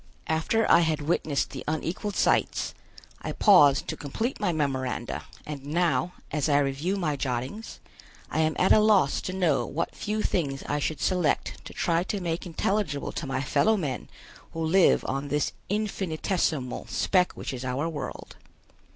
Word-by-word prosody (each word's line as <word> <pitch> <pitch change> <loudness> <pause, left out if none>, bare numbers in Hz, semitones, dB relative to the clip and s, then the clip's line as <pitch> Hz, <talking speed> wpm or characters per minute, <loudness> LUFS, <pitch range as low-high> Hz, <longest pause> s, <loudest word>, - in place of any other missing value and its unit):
After 165 +8 +1
I - - +7
had 160 -3 +1
witnessed 150 -2 0
the 130 - -6
unequaled 165 +6 -2
sights, - - +1 0.5
I - - -4
paused 145 -10 +6
to - - -2
complete 220 - -3
my 205 -4 +1
memoranda 130 -6 -2 0.2
and 145 -3 -6
now, 160 0 0 0.2
as 150 0 0
I 145 - +4
review 145 +7 0
my 160 -7 -1
jottings, 130 - -4 0.5
I - - -1
am 155 -1 +2
at 185 - +3
a - - +8
loss 210 -9 +4
to - - -4
know 175 -7 +2
what 165 - -3
few 215 +1 -2
things 140 -6 -1
I 145 - -1
should 155 +1 -2
select 180 -4 0
to - - -9
try 170 -1 +1
to 205 - -2
make 170 0 -3
intelligible 175 -3 -1
to 150 - -5
my 135 0 -1
fellow 220 +10 +3
men 140 - -3 0.4
who 165 0 -2
live 180 +3 +4
on 135 +2 -2
this 145 +1 0 0.2
infinitesimal 180 - -1
speck 180 -2 +2
which - - -5
is 125 0 -5
our 130 +5 -1
world. 155 -3 -6
160 Hz, 165 wpm, -27 LUFS, 140-185 Hz, 0.5 s, a